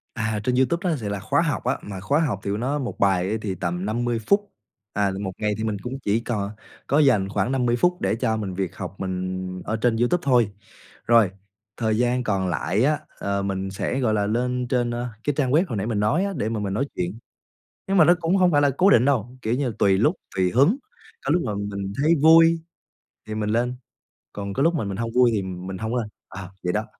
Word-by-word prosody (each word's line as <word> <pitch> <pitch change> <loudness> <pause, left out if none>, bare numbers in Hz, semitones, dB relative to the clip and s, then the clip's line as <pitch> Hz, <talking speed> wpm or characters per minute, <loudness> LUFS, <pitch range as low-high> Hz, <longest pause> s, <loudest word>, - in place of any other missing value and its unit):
À, 110 -2 -1
trên 125 +3 +1
YouTube 170 +8 +1
á, 160 - +1
thì 105 - -3
là 100 - -3
khóa 110 - +1
học 155 -8 -1
á, - - 0
mà 100 -2 -7
khóa 140 +10 +1
học 125 - 0
thì 100 - -2
nó 130 +8 -1
1 125 - -5
bài 95 -1 +2
á - - 0
thì 100 -3 -3
tầm 90 +1 -3
50 120 +2 -1
phút, 205 0 +2 0.4
à, 100 -1 +1
1 95 -2 -3
ngày 105 -1 0
thì 110 - -3
mình 110 -2 -1
cũng 130 +2 -5
chỉ 105 -3 +1
cò 105 -4 -3 0.4
có 140 - +3
dành 115 -10 +3
khoảng 105 +4 0
50 125 -3 +1
phút 180 +8 +1
để - - +1
cho 110 -1 0
mình 100 -4 -4
việc 95 -1 -3
học 95 0 -6
mình 95 0 -4
ở 110 - -1
trên 120 -2 +3
YouTube 120 +10 +2
thôi. 120 -6 +3 0.6
Rồi, 115 -5 +5 0.5
thời 110 -2 0
gian 125 +1 +1
còn 95 -4 0
lại 90 +5 0
á, 150 +2 +2 0.2
ờ, 100 0 -1
mình 95 -1 -2
sẽ, 115 +6 -2
gọi 115 -5 +1
là, 105 -1 +1
lên 125 +3 -1
trên, 120 -1 0
ơ, 120 +1 -3 0.2
cái 145 - 0
trang 130 -3 +1
web 155 +5 +4
hồi 115 - -3
nãy 100 +3 -2
mình 110 -3 -1
nói 145 - +2
á 200 - -3
để 110 -2 -1
mà 110 -1 -2
mình 100 -2 -2
nói 135 +7 0
chuyện. 90 +5 -3 0.7
Nhưng 195 - +1
mà 160 - +7
nó 175 +2 +6
cũng 170 +2 +1
hông 180 -2 +4
phải 145 - +4
là 145 - +4
cố 190 - +5
định 125 - +5
đâu, 125 -2 0
kiểu 110 0 -1
như, 125 -4 -1
tùy 95 -1 +4
lúc, 150 - +3 0.2
tùy 90 -1 +2
hứng, 140 - +4 0.5
có - - +1
lúc 175 - +3
mà 105 - -2
mình 100 -1 -4
thấy 160 +2 +5
vui 165 +1 +7 0.7
thì 110 - -4
mình 105 -1 -2
lên, 120 +3 0 0.6
còn 100 -1 -5
có 135 - 0
lúc 170 +2 +3
mà 150 - -1
mình 100 -1 -4
hông 115 +1 -3
vui 125 -1 +5
thì 105 - +1
mình 95 0 -6
hông 110 +5 -3
lên. 115 -3 -1 0.2
Ờ, 95 -1 -8
vậy 90 0 0
đó. 105 +1 -1
110 Hz, 245 wpm, -24 LUFS, 100-130 Hz, 0.7 s, mà